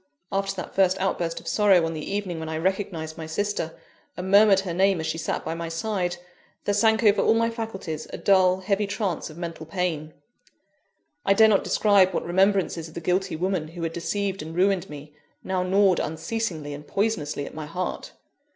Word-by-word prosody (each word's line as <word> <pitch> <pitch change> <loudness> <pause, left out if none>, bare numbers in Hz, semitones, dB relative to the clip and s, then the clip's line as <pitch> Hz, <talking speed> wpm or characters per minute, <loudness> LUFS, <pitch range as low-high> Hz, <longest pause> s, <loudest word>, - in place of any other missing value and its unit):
After 195 0 -1
that 185 - -6
first 190 -1 +3
outburst 175 -3 -1
of - - -14
sorrow 195 -5 +4
on 165 - -3
the 155 -1 -5
evening 195 -5 -3
when 160 0 -5
I 160 - -3
recognised 165 -3 -2
my 160 - -5
sister, 165 -1 -2 0.4
and 185 +1 -4
murmured 200 -1 +6
her 185 -3 -4
name 190 0 +3
as 160 - -3
she 165 - -2
sat 165 - -3
by 160 - -2
my 165 0 -5
side, 175 0 -2 0.5
there 205 - +1
sank 220 +2 +3
over 210 -1 +5
all 225 - +4
my 230 0 +2
faculties 195 -9 -5
a - - -5
dull, 185 -1 +3
heavy 200 +2 0
trance 200 -5 -2
of 155 - -12
mental 165 -2 -6
pain. 160 -4 -3 1.1
I 195 - +3
dare 220 +1 +7
not 200 -3 +3
describe 200 -3 +3
what - - -1
remembrances 185 -2 +1
of 160 - -15
the - - -3
guilty 180 +1 0
woman 180 -1 -1
who 165 +1 -8
had 165 0 -2
deceived 195 +3 -2
and 160 +2 -7
ruined 190 0 +2
me, 150 0 -10 0.3
now 190 -1 -1
gnawed 190 0 +3
unceasingly 160 -2 -3
and 150 +1 -9
poisonously 160 -9 -1
at - - -9
my 155 -1 -6
heart. 180 +4 -4
185 Hz, 195 wpm, -25 LUFS, 165-200 Hz, 1.1 s, dare